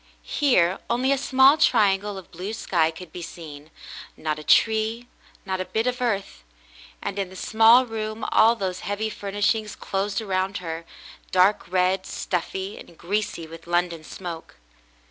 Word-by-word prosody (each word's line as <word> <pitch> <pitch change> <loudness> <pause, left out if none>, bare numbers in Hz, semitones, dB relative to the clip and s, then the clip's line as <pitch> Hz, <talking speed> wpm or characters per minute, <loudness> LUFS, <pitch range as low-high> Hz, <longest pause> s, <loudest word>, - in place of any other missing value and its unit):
Here 190 -11 +2
only 250 +3 +1
a 275 - +3
small 270 +2 +5
triangle 205 -3 +3
of 190 - -11
blue 185 +5 -5
sky 170 -7 +1
could 165 +1 -10
be 180 - -7
seen 155 -3 -9 0.2
— - - -13
not 155 -1 -2
a - - -9
tree, 220 +5 +2 0.4
not 190 -1 -2
a - - -3
bit 220 +4 -1
of 250 0 -1
earth 200 - -2 0.3
— - - -21
and 200 - -3
in 195 -2 -2
the 190 - -13
small 225 +6 +5
room 220 -1 -4
all 225 +2 +5
those 190 -4 -3
heavy 205 +3 -3
furnishings 205 +1 -1
closed 195 +2 -2
around 195 -2 -1
her, 165 -1 -6 0.4
dark 185 0 +3
red, 185 +1 +1
stuffy, 190 +2 -3
and 170 - -14
greasy 195 -2 -2
with 165 +1 -12
London 175 -2 0
smoke. 170 0 -8
195 Hz, 165 wpm, -24 LUFS, 175-220 Hz, 0.4 s, small